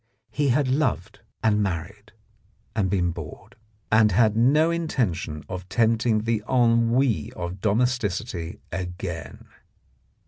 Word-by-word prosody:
He 145 Hz, -1 st, 0 dB
had 135 Hz, +2 st, +2 dB
loved 130 Hz, -, -1 dB, 0.2 s
and 105 Hz, -1 st, +3 dB
married, 100 Hz, +3 st, -4 dB, 0.6 s
and 95 Hz, -3 st, +1 dB
been 90 Hz, -3 st, +1 dB
bored, 85 Hz, +7 st, -10 dB, 0.4 s
and 110 Hz, 0 st, +5 dB
had 110 Hz, +2 st, +3 dB
no 145 Hz, +8 st, +4 dB
intention 100 Hz, -, -2 dB
of 90 Hz, 0 st, -7 dB
tempting 110 Hz, +1 st, +2 dB
the 115 Hz, -1 st, 0 dB
ennui 115 Hz, -, +2 dB
of 85 Hz, +2 st, -6 dB
domesticity 105 Hz, -6 st, -1 dB
again. 90 Hz, -1 st, -6 dB
105 Hz, 110 wpm, -24 LUFS, 90-120 Hz, 0.6 s, and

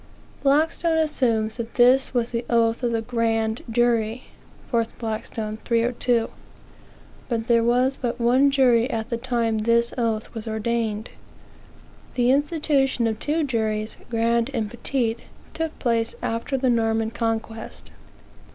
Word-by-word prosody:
Blackstone 320 Hz, +4 st, +2 dB
assumes 235 Hz, -8 st, 0 dB
that 230 Hz, -1 st, -6 dB
this 255 Hz, +2 st, +5 dB
was 240 Hz, -2 st, -1 dB
the 235 Hz, 0 st, -2 dB
oath 230 Hz, 0 st, +2 dB
of 240 Hz, -2 st, 0 dB
the 225 Hz, -1 st, -1 dB
grand 225 Hz, -1 st, -1 dB
jury 235 Hz, 0 st, +1 dB, 0.5 s
4 230 Hz, -2 st, +2 dB
Blackstone, 220 Hz, -1 st, -4 dB
302); 235 Hz, 0 st, +1 dB, 1.0 s
but 230 Hz, -2 st, -1 dB
there 235 Hz, -1 st, +3 dB
was 250 Hz, +3 st, +2 dB
but 240 Hz, -1 st, -2 dB
one 255 Hz, +4 st, +4 dB
jury 255 Hz, -3 st, +3 dB
at 225 Hz, -1 st, -3 dB
the 235 Hz, -, 0 dB
time 235 Hz, -2 st, 0 dB
this 235 Hz, +2 st, +2 dB
oath 225 Hz, -1 st, -1 dB
was 225 Hz, -1 st, -6 dB
ordained. 220 Hz, 0 st, -2 dB, 1.0 s
The 245 Hz, 0 st, +3 dB
institution 285 Hz, -3 st, +1 dB
of 220 Hz, -1 st, -1 dB
two 310 Hz, +2 st, 0 dB
juries, 220 Hz, -5 st, -2 dB
grand 230 Hz, +1 st, +1 dB
and 215 Hz, -2 st, -2 dB
petit, 240 Hz, -1 st, -1 dB, 0.4 s
took 325 Hz, -1 st, -3 dB
place 230 Hz, -2 st, 0 dB
after 230 Hz, +4 st, -1 dB
the 260 Hz, -1 st, +2 dB
Norman 225 Hz, -1 st, +1 dB
Conquest. 225 Hz, -1 st, -4 dB
235 Hz, 135 wpm, -24 LUFS, 225-250 Hz, 1.0 s, this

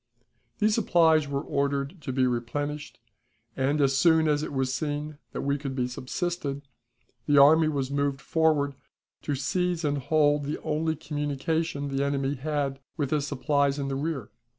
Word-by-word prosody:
These 215 Hz, +1 st, +2 dB
supplies 165 Hz, -8 st, +4 dB
were 140 Hz, 0 st, -2 dB
ordered 140 Hz, +4 st, -1 dB
to 135 Hz, -, -4 dB
be 130 Hz, 0 st, +2 dB
replenished, 145 Hz, +5 st, -3 dB, 0.6 s
and, 140 Hz, +3 st, +1 dB
as 135 Hz, -1 st, +3 dB
soon 160 Hz, +1 st, +4 dB
as 150 Hz, -1 st, +2 dB
it -, -, -4 dB
was 130 Hz, -2 st, -1 dB
seen 150 Hz, 0 st, -3 dB
that -, -, -4 dB
we 140 Hz, +1 st, 0 dB
could 135 Hz, -2 st, -4 dB
be 125 Hz, -2 st, 0 dB
subsisted, 140 Hz, +3 st, -3 dB, 0.6 s
the 145 Hz, -1 st, +4 dB
army 155 Hz, +3 st, +7 dB
was 140 Hz, -3 st, -1 dB
moved 140 Hz, -1 st, 0 dB
forward 150 Hz, -2 st, +1 dB, 0.5 s
to 145 Hz, -, -2 dB
seize 175 Hz, +4 st, -1 dB
and 145 Hz, -1 st, 0 dB
hold 145 Hz, +1 st, +2 dB
the 150 Hz, -, -3 dB
only 160 Hz, +1 st, 0 dB
communication 145 Hz, 0 st, -2 dB
the 135 Hz, 0 st, 0 dB
enemy 140 Hz, -1 st, 0 dB
had 140 Hz, -1 st, -2 dB, 0.2 s
with 145 Hz, -4 st, -1 dB
his 150 Hz, -2 st, 0 dB
supplies 140 Hz, +1 st, +1 dB
in 140 Hz, -1 st, -2 dB
the 135 Hz, -, -2 dB
rear. 140 Hz, -6 st, -3 dB
145 Hz, 165 wpm, -27 LUFS, 140-155 Hz, 0.6 s, army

